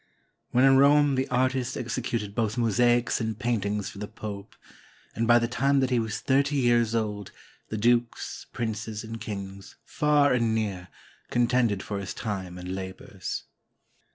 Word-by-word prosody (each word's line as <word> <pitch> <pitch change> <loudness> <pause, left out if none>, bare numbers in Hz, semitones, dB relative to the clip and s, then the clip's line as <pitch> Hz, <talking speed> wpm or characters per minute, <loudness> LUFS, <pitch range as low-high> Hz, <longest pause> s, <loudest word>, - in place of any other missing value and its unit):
When 125 +2 +4
in 135 0 +6
Rome 145 +1 +5
the 130 +1 0
artist 130 0 0
exe 125 0 -3
cuted 115 -4 -3
both 110 0 -1
mosaics 120 +1 +2
and 110 -2 -2
paintings 105 -4 -1
for 100 - -11
the 105 - -4
Pope, 100 -1 -8 0.6
and 115 0 -1
by 120 0 +7
the 120 0 +1
time 135 +4 +2
that 130 -1 +1
he 125 - +3
was 110 0 -3
thirty 140 +2 +2
years 120 -3 +3
old, 105 -3 -2 0.4
the 110 - -3
dukes, 120 +2 0
princes, 110 -2 -4
and 115 0 -7
kings, 100 -1 -7
far 150 -2 +3
and 115 -3 +1
near, 100 -5 -2 0.4
contended 120 -4 +2
for 100 -1 -4
his 100 -2 -6
time 95 -5 -4
and 90 +1 -5
labors. 95 0 -6
115 Hz, 160 wpm, -27 LUFS, 105-125 Hz, 0.6 s, by